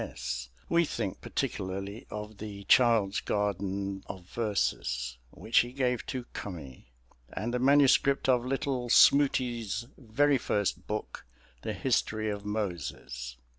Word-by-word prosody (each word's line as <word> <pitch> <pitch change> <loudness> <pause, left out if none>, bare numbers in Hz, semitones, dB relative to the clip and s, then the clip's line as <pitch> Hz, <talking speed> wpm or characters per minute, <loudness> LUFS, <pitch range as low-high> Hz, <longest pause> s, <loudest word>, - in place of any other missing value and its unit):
S. - - -5 0.2
we 170 0 +4
think 115 - -3
particularly 100 +4 -4
of 105 -1 -7
the 100 -2 -7
"Child's 115 -3 +4
Garden 100 -1 -2
of 95 -2 -8
Verses" 65 - -1
which 110 - +2
he 120 +1 0
gave 125 -3 0
to 130 -1 -3
Cummy, 85 - -7 0.5
and 115 +4 -3
the 125 - +1
manuscript 140 +1 +4
of 125 -2 +4
little 130 -1 -2
"Smoutie's" 120 -5 +4
very 135 +3 +2
first 105 -3 -1
book, 105 -10 -5 0.3
the - - -3
"History 110 0 0
of 100 0 -5
Moses." 85 - -4
105 Hz, 125 wpm, -30 LUFS, 95-125 Hz, 0.5 s, we